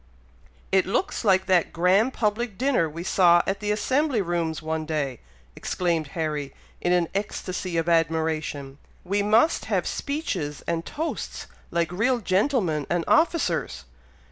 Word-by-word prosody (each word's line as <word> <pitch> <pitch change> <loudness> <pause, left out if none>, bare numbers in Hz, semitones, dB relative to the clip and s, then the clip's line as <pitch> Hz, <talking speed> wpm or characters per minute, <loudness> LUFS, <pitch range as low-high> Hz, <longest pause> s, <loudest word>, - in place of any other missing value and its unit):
"It 190 -1 +3
looks 240 - -1
like 190 -3 +3
that 185 -3 +2
grand 190 +8 +3
public 215 -1 -1
dinner 255 - +2
we 165 +3 -7
saw 175 -2 +5
at 195 +1 -1
the 210 0 -3
Assembly 260 +5 +1
Rooms 170 -4 -1
one 160 0 -3
day!" 150 -6 -2 0.4
exclaimed 170 -4 -1
Harry, 150 -4 -2 0.3
in 175 - +1
an 175 -2 +3
ecstacy 185 -3 -3
of 165 0 0
admiration. 160 -4 0 0.2
"We 200 +3 0
must 220 +10 +3
have - - 0
speeches 280 - -3
and 165 0 -2
toasts 320 +2 -4 0.2
like 170 0 0
real 235 +8 +1
gentlemen 190 - 0
and 175 -1 0
officers. 315 - +1
180 Hz, 140 wpm, -25 LUFS, 160-210 Hz, 0.4 s, saw